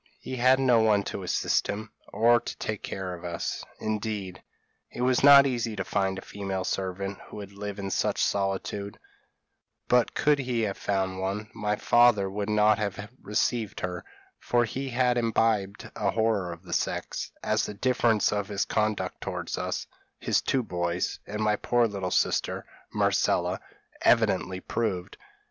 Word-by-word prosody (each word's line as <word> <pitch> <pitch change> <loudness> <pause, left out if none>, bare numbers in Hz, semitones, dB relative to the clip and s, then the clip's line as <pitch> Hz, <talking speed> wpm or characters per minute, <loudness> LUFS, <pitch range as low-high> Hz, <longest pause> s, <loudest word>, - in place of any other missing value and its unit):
He 130 - -6
had 130 +2 +5
no 125 -3 +4
one 105 -2 +3
to - - -5
assist - - +1
him, 110 +2 -5 0.2
or 120 +1 +4
to - - -7
take 110 -2 -3
care 95 -1 -4
of 85 - -9
us 85 -1 -3 0.2
indeed, 105 -4 -3 0.5
it - - -7
was 125 +1 +2
not 140 -1 +9
easy 120 -4 -1
to 100 - -2
find 95 0 -1
a - - -7
female 95 -2 -4
servant 95 +1 -3
who - - -10
would 100 -1 -8
live 100 0 -6
in 100 -1 -4
such - - 0
a - - +3
solitude; 100 +1 -2 0.9
but 125 -1 +3
could 150 -1 +3
he 125 -3 -1
have 100 -3 -2
found 95 -2 -1
one, 100 +3 -3
my 105 -2 -1
father 120 -3 +4
would 100 +1 -3
nut 105 0 +4
have 105 +1 -4
received 110 +1 -1
her, 90 -1 -4 0.4
for 120 -1 +2
he 135 +4 -4
had 125 0 +2
imbibed 110 -3 0
a 105 -2 0
horror 110 -5 +1
of 85 +1 -10
the - - -7
sex, - - -2
as - - +1
the 105 - -6
difference 115 -1 +2
of 105 -1 -1
his 100 -1 -1
conduct 110 -1 -1
towards - - -4
us, - - -3 0.3
his - - +1
two 130 -2 0
boys, 85 -3 -2
and 105 +1 -3
my 105 0 +3
poor 120 +2 +2
little 100 -3 -3
sister, - - 0 0.3
Marcella - - +1 0.4
evidently 95 0 +3
proved. 95 -6 -2
105 Hz, 165 wpm, -27 LUFS, 95-115 Hz, 0.9 s, not